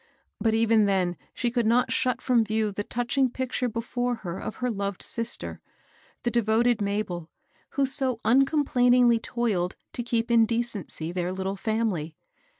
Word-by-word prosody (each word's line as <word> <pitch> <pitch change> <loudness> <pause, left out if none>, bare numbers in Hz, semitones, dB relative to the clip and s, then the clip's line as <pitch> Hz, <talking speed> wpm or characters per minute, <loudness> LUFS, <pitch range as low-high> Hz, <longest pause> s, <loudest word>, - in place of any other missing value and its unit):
But 220 -1 +2
even 225 -1 +4
then 185 -3 +1 0.2
she 240 -1 -2
could 240 -2 +1
not 240 +2 +3
shut 250 -1 0
from 245 -3 +3
view 215 0 0
the 205 +1 -3
touching 245 +4 0
picture 250 0 -2
before 245 +2 -2
her 175 +1 -4
of - - -5
her 250 -1 -1
loved 200 -2 -3
sister, 230 0 -4 0.3
— - - -32
the 240 - 0
devoted 235 0 +2
Mabel, 200 -5 -2 0.5
who 280 - +4
so 260 -3 -1
uncom 275 +6 +4
plainingly 245 -2 +4
toiled 210 -9 -1 0.2
to - - -3
keep 235 0 -1
in 230 -1 +5
decency 220 -8 -2
their 180 0 -2
little 190 +1 -3
family. 200 -8 -1
230 Hz, 160 wpm, -26 LUFS, 200-245 Hz, 0.5 s, in